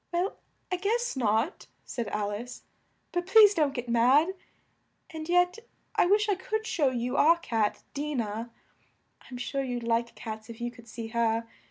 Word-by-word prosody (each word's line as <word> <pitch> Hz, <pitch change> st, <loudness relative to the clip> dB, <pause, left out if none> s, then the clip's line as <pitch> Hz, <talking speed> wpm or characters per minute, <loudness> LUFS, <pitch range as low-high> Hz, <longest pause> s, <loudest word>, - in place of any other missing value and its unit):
"Well, 355 Hz, +3 st, -1 dB, 0.3 s
I 365 Hz, -, +1 dB
guess 460 Hz, +4 st, 0 dB
not," 230 Hz, -, 0 dB, 0.2 s
said 235 Hz, -4 st, -4 dB
Al 205 Hz, 0 st, -2 dB
ice, 240 Hz, +4 st, -7 dB, 0.5 s
"but 350 Hz, 0 st, -2 dB
please 420 Hz, 0 st, +8 dB
don't 295 Hz, -6 st, +1 dB
get 245 Hz, -1 st, -4 dB
mad. 250 Hz, +8 st, +4 dB, 0.8 s
And 315 Hz, 0 st, -7 dB
yet 355 Hz, +3 st, +3 dB, 0.3 s
I -, -, +3 dB
wish 420 Hz, +3 st, +3 dB
I 410 Hz, -, +3 dB
could 435 Hz, +4 st, -3 dB
show 295 Hz, -10 st, +2 dB
you 250 Hz, +1 st, -2 dB
our 335 Hz, +3 st, +6 dB
cat, 225 Hz, -10 st, -1 dB
Di 295 Hz, +1 st, -3 dB
nah. 225 Hz, -1 st, -2 dB, 0.8 s
I'm 250 Hz, -, -7 dB
sure 275 Hz, +3 st, -2 dB
you'd 245 Hz, -2 st, -3 dB
like 230 Hz, 0 st, 0 dB
cats 220 Hz, 0 st, -7 dB
if 230 Hz, 0 st, -9 dB
you 240 Hz, 0 st, -3 dB
could 235 Hz, -1 st, -16 dB
see 230 Hz, 0 st, -7 dB
her. 230 Hz, 0 st, 0 dB
250 Hz, 175 wpm, -28 LUFS, 230-350 Hz, 0.8 s, please